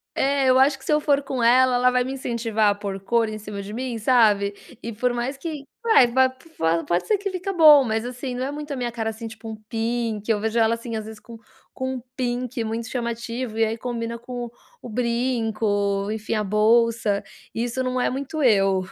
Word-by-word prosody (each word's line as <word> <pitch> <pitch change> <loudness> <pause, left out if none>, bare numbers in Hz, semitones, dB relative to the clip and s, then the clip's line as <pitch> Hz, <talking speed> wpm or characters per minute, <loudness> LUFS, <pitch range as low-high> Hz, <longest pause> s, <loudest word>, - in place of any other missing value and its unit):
É, 275 0 +2
eu 255 - +5
acho 270 +1 +4
que, 265 - -16
se 300 - 0
eu 300 - +4
for 285 -1 +2
com 265 -3 -3
ela, 250 +2 +5
ela 250 +1 +4
vai 250 0 +1
me 260 - -4
incentivar 230 -4 0
a 205 - +1
por 200 -1 -5
cor 230 +3 +1
em 215 - -5
cima 205 -1 -7
de 200 - -8
mim, 245 +1 -3
sabe. 210 -4 +3 0.3
E 230 - -5
por 245 +3 0
mais 250 +3 -3
que 300 -2 -6 0.2
vai, 445 - +6
va 260 +2 +3
po 215 - -2
pode 175 +1 0
ser 430 - +3
que 400 0 -4
fica 370 +1 -4
bom, 310 -6 +8
mas, 220 -2 -1
assim, 250 +1 -5
não 250 +1 -2
é 270 - -2
muito 295 0 -7
a - - -3
minha 245 -2 -3
cara, 225 -1 -3
assim, 225 +1 -6
tipo 225 0 -9
um 220 - -6
pink. 230 -2 -2
Eu 215 - +3
vejo 220 +2 -1
ela, 225 0 +4
assim, 230 0 -5
às 215 - -4
vezes, 220 0 -9
com 230 0 -12 0.4
com 260 0 -3
um 255 - -5
pink 245 -1 -2
muito 225 +1 -3
chamativo, 235 -1 -4
e 225 - +3
aí 220 +1 -2
combina 235 -1 -4
com 240 0 -6 0.3
o - - -8
brinco, 220 -4 0
enfim, 220 0 -3
a 215 -1 0
bolsa, 215 0 +2 0.3
isso 240 +3 -2
não 255 0 -1
é - - +1
muito 280 +4 -4
eu, 195 -6 +3
235 Hz, 225 wpm, -23 LUFS, 220-260 Hz, 0.4 s, bom